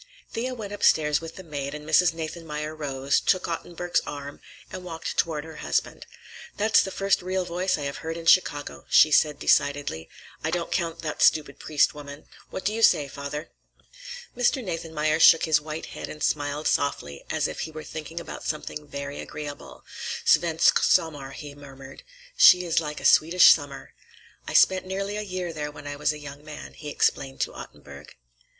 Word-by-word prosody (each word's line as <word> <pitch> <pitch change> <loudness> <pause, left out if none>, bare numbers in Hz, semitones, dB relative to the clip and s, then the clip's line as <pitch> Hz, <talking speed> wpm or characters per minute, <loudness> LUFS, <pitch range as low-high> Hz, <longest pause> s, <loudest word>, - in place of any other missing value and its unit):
Thea 255 +3 -3
went 205 -4 -7
upstairs 150 -7 +3
with 165 0 -9
the 190 - -9
maid 145 -3 -5
and 150 0 -9
Mrs. 170 +3 +4
Nathanmeyer 155 -2 -5
rose, 140 -2 0
took 185 -2 +1
Ottenburg's 175 +1 -2
arm, 145 0 -7 0.3
and 185 - -7
walked 165 -2 -5
toward 155 -3 0
her 160 0 -11
husband. - - -2 0.5
"That's 215 +1 +4
the - - -3
first 195 0 0
real 185 0 -2
voice 180 +1 -1
I 150 - -5
have 140 0 -4
heard 165 +1 -5
in 165 - -8
Chicago," 145 -4 +2
she 155 - +6
said 150 +1 +3
decidedly. 140 - +1 0.3
"I 160 - 0
don't 170 0 -2
count 165 -2 -2
that 150 -2 -4
stupid 150 -3 +3
Priest 150 -2 +2
woman. 145 0 -10 0.2
What - - -7
do 210 - +1
you 225 - -3
say, 150 -9 +5
father?" 140 +3 -7 0.8
Mr. 250 +2 +1
Nathanmeyer 160 -4 -1
shook 165 0 +7
his 155 -2 +3
white 155 +1 -6
head - - -8
and 150 - -7
smiled 145 +1 -1
softly, 75 - -1
as - - 0
if - - -7
he 160 - -4
were 155 0 -8
thinking 160 +2 -7
about - - -8
something 150 -1 -5
very 140 0 -6
agreeable. 150 -1 -8 0.4
"Svensk 165 -2 +4
sommar," 145 -4 +1
he 145 0 -9
murmured. 135 -1 -12 0.3
"She 180 0 +7
is 165 -1 +2
like 150 -2 -5
a - - -8
Swedish 175 +3 +7
summer. 145 -3 -1 0.5
I - - -5
spent 185 0 +4
nearly 195 +2 -3
a 210 - -2
year 185 -4 -4
there 150 -1 -4
when 145 -1 -12
I 145 0 -5
was 145 - +1
a 150 - -7
young 145 -1 -10
man," 155 -1 -9
he 150 - -8
explained 135 -2 0
to - - -1
Ottenburg. - - -12
155 Hz, 185 wpm, -25 LUFS, 145-175 Hz, 0.8 s, shook